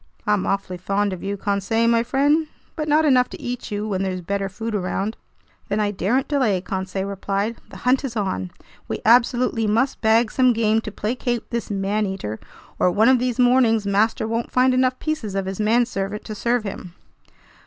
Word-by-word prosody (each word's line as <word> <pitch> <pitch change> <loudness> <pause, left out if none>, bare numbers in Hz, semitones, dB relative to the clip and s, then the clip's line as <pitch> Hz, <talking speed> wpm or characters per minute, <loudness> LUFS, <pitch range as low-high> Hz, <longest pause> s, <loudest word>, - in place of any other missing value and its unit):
"I'm 210 -2 +1
awfully 195 -2 -2
fond 200 +2 -1
of 185 - -7
you, 200 +1 -3
Conseil 200 +3 0
my 230 0 +4
friend, 285 +6 +2 0.3
but 310 -2 -3
not 305 +1 +3
enough 255 -4 +4
to - - -9
eat 245 0 -5
you 210 0 -3
when 195 -3 -1
there's 185 -1 -2
better 195 +2 -2
food 225 +4 -5
around." 200 +2 -2 0.5
"Then 205 +1 0
I 205 -1 +1
daren't 210 +7 0
delay," 255 -10 +1
Conseil 190 +1 -3
replied. 200 +3 -2
"The - - -10
hunt 255 +2 +3
is 255 -4 -4
on! 140 - -2 0.4
We - - -4
absolutely 235 -1 +3
must 230 +6 +1
bag 220 0 +3
some 255 -2 +4
game 220 -1 +2
to 215 - -7
placate 240 +4 -3
this 235 -1 -3
man 205 +1 0
eater, 150 - -5 0.4
or - - +4
one 215 +7 +4
of 260 -1 +5
these 245 -1 -1
mornings 245 -4 +4
master 215 +2 +1
won't 230 +1 -2
find 255 0 +3
enough 255 0 +2
pieces 255 -11 -3
of 195 -1 -1
his 190 +1 -5
manservant 210 -2 0
to 215 - -5
serve 235 +2 0
him." 185 -3 -7
215 Hz, 190 wpm, -22 LUFS, 195-245 Hz, 0.5 s, of